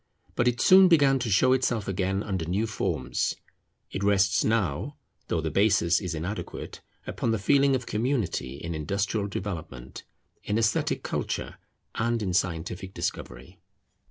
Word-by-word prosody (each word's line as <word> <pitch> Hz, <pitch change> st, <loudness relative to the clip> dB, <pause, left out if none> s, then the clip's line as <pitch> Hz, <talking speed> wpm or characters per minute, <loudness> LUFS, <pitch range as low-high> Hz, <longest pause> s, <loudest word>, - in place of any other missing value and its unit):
But 120 Hz, -, +1 dB
it 120 Hz, -1 st, +1 dB
soon 185 Hz, 0 st, +7 dB
began 140 Hz, -6 st, +4 dB
to 120 Hz, -2 st, -2 dB
show 110 Hz, +6 st, +4 dB
itself 120 Hz, -5 st, 0 dB
again 95 Hz, +1 st, -1 dB
under 95 Hz, -5 st, -3 dB
new 95 Hz, +7 st, 0 dB
forms. 110 Hz, -, -2 dB, 0.6 s
It 100 Hz, -, -4 dB
rests 100 Hz, -1 st, +3 dB
now, 110 Hz, -, -1 dB, 0.3 s
though 85 Hz, -, -1 dB
the 80 Hz, -1 st, -3 dB
basis 95 Hz, -2 st, +3 dB
is 90 Hz, -4 st, -3 dB
inadequate, 90 Hz, +7 st, -6 dB, 0.2 s
upon -, -, -2 dB
the 115 Hz, -, +1 dB
feeling 140 Hz, +6 st, +3 dB
of 125 Hz, -2 st, -3 dB
community 105 Hz, -, -1 dB
in 85 Hz, +4 st, -6 dB
industrial 100 Hz, +6 st, -1 dB
development, 80 Hz, -11 st, -6 dB, 0.4 s
in 105 Hz, -, -1 dB
esthetic 115 Hz, -1 st, 0 dB
culture, -, -, -3 dB, 0.4 s
and 115 Hz, 0 st, -1 dB
in 95 Hz, -3 st, -2 dB
scientific 90 Hz, +2 st, -2 dB
discovery. 60 Hz, +2 st, -5 dB
100 Hz, 145 wpm, -27 LUFS, 85-115 Hz, 0.6 s, soon